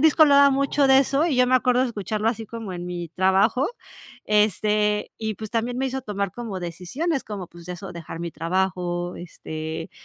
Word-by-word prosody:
disco 315 +1 +5
hablaba 280 -1 +7
mucho 275 +1 +2
de 265 0 +7
eso 275 +3 +2
y 310 - +1
yo 250 0 +5
me 255 +1 +5
acuerdo 250 0 +2
de 260 - +2
escucharlo 215 0 -2
así 225 -1 -3
como 225 -4 -6
en 175 0 -6
mi 175 -1 -5
trabajo, 190 - +2 0.6
este 210 0 +2
y, 220 -1 -2
pues 215 0 -8
también 235 +1 -1
me 265 - -1
hizo 265 +1 -3
tomar 200 -5 -3
como 220 -6 -5
decisiones, 185 - -3
como, 200 -4 -6
pues 170 0 -14
de 180 - -4
eso, 185 +1 -8
dejar 165 0 -8
mi 170 -1 -4
trabajo, 175 0 -1
este, 160 -1 -6
210 Hz, 195 wpm, -24 LUFS, 180-250 Hz, 0.6 s, hablaba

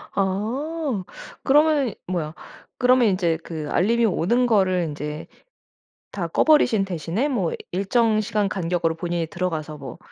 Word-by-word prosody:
아. 230 - -1 0.4
그러면은 290 -5 +3
뭐야 165 -4 -3 0.4
그러면 250 -2 +4
인제 175 -4 +1
그 155 -3 -6
알림이 230 +5 +2
오는 235 +6 +2
거를 190 -6 +2
인제 150 0 -5 0.8
다 175 -4 -3
꺼버리신 230 - +3
대신에 180 - -2
뭐 200 - 0 0.2
일정 215 +4 +2
시간 210 0 0
간격으로 170 -3 -1
본인이 170 -1 -2
들어가서 160 -4 -3
뭐 135 -3 -9
190 Hz, 280 characters per minute, -23 LUFS, 165-235 Hz, 0.8 s, 그러면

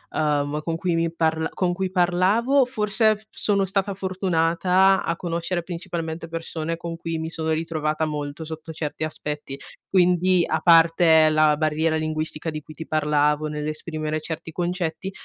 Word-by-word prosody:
uhm, 150 0 0
con 165 - -2
cui 175 -1 -1
mi 165 0 0
parl 160 -1 0
con 180 -2 0
cui 190 0 -2
parlavo 195 +9 +3
forse 215 -2 +2
f 215 - -22
sono 200 -2 +1
stata 195 +1 -1
fortunata 185 0 +2
a 170 - -1
conoscere 170 +1 -2
principalmente 165 -1 -5
persone, 165 0 -4
con 170 0 -5
cui 165 -1 -4
mi 160 - -4
sono 160 -1 -3
ritrovata 155 -1 -1
molto 150 0 -4
sotto 160 +1 -7
certi 155 0 -4
aspetti, 150 -3 -5 0.3
quindi 180 -1 +3
a 160 - 0
parte 165 -1 +5
la 155 -1 +4
barriera 155 +1 +1
linguistica 155 0 -3
di 155 - -5
cui 155 - -12
ti 160 - -7
parlavo, 150 0 +1
nell'esprimere 155 +1 -3
certi 160 +1 -6
concetti, 175 +1 -3
165 Hz, 155 wpm, -23 LUFS, 155-180 Hz, 0.3 s, parte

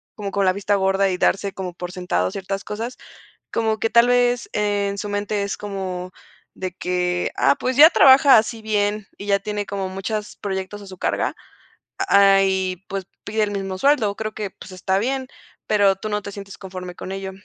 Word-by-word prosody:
como 205 -2 -4
con 200 0 +1
la 185 - +4
vista 205 +1 0
gorda, 195 0 +2
y 180 - -1
darse 195 +1 +1
como 185 -2 -5
por 180 0 -6
sentado 180 - -1
ciertas 195 0 -4
cosas. 225 +4 -5 0.5
Como 220 -1 0
que 225 - 0
tal 235 +1 +6
vez, 245 0 +2
en 205 -1 0
su 205 +1 -4
mente 205 0 -1
es 200 - -3
como, 185 -3 -5 0.4
de 185 -1 -4
que: 180 -1 -1
"Ah, - - +4
pues 255 0 -1
ya 305 +3 +10
trabaja 270 -3 +7
así 220 +1 -4
bien, 210 -1 0
y 200 - -7
ya 200 -1 +4
tiene 205 0 -3
como, 195 -1 -3
muchas 210 +3 -4
proyectos 195 0 -4
a 200 - -11
su 190 -1 -10
carga. - - -1 0.7
Ah, 195 -1 +6
y 190 -1 -1
pues 195 -1 -4 0.2
pide 215 +1 0
el 205 - -1
mismo 195 -2 -3
sueldo. 230 -4 +2
Creo 215 0 -4
que 210 -2 -4
pues - - -13
está 190 +1 -1
bien". 260 +4 -2 0.4
Pero 200 -2 +4
tú 215 - -5
no 210 0 -1
te 200 - -6
sientes 200 -1 -9
conforme 185 -2 -8
con 185 - -7
ello. 195 0 -5
200 Hz, 200 wpm, -22 LUFS, 190-215 Hz, 0.7 s, ya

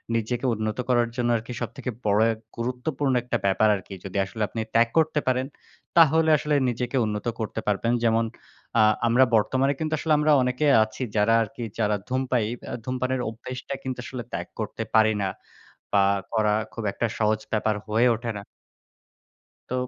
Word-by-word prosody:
নিজেকে 120 +3 -1
উন্নত 110 +1 -3
করার 120 -1 +3
জন্য 120 -1 0
আরকি 115 +3 -7
সবথেকে 125 +2 -4
বড় 105 +1 +3 0.3
গুরুত্বপূর্ণ 130 +3 -2
একটা 120 -1 -1
ব্যাপার 100 +3 +3
আরকি। 95 0 -8
যদি 95 +1 -4
আসলে 110 +3 -8
আপনি 110 +4 -4
ত্যাগ 115 0 +5
করতে 155 -1 +3
পারেন, 130 0 +1 0.5
তাহলে 160 0 +6
আসলে 150 +1 0
নিজেকে 125 +2 -2
উন্নত 105 +2 -3
করতে 110 0 -3
পারবেন। 115 +4 +1
যেমন 115 0 +3 0.5
আ - - +7 0.3
আমরা 125 +3 +5
বর্তমানে 130 +6 +2
কিন্তু 155 0 -2
আসলে 160 -1 +1
আমরা 150 0 +3
অনেকে 125 +4 0 0.2
আছি 110 +4 -8
যারা 105 +2 +3
আরকি 115 +2 -5 0.2
যারা 105 -1 +2
ধূম 130 +1 0
পায়ী 115 -4 +2 0.2
আ - - -4
ধূমপানের 130 0 -1
অভ্যেসটা 130 +4 -7
কিন্তু 130 -1 -4
আসলে 125 -3 -6
ত্যাগ - - -4
করতে - - -3
পারি 110 0 +5
না। - - +1 0.7
বা 100 - +5 0.3
করা 105 -2 +2 0.2
খুব 115 - -6
একটা 120 - -1
সহজ 110 0 +2
ব্যাপার 110 0 +1
হয়ে 115 +3 +3
ওঠে 115 +1 -4
না। 100 - -6 1.3
তো - - -4
120 Hz, 170 wpm, -25 LUFS, 110-130 Hz, 1.3 s, আ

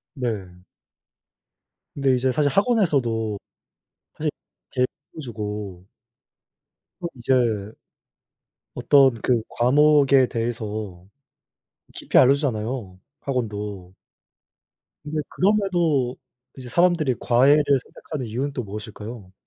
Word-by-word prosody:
네. 100 -9 -4 1.3
근데 135 -2 +2
이제 130 +1 +1
사실 145 +2 +1
학원에서도 135 - +1 0.8
사실 - - -1 0.4
개 125 - +1 0.4
주고 105 -6 -6 1.1
또 170 - -3
이제 120 -5 0 1.0
어떤 135 -3 +5
그 120 -3 +2
과목에 140 +1 +4
대해서 110 -5 -4 0.9
깊이 - - -2
알려 130 +2 +7
주잖아요 115 -7 -3 0.2
학원도. 105 -7 -4 1.1
근데 155 +1 -4
그럼에도 175 -10 +1 0.4
이제 125 -2 -9
사람들이 170 -4 +2
과외를 140 +5 +4 0.2
선택하는 145 -6 -7
이유는 130 +6 -3
또 130 -3 -3
무엇일까요? 105 0 -8
125 Hz, 210 characters per minute, -23 LUFS, 105-140 Hz, 1.3 s, 알려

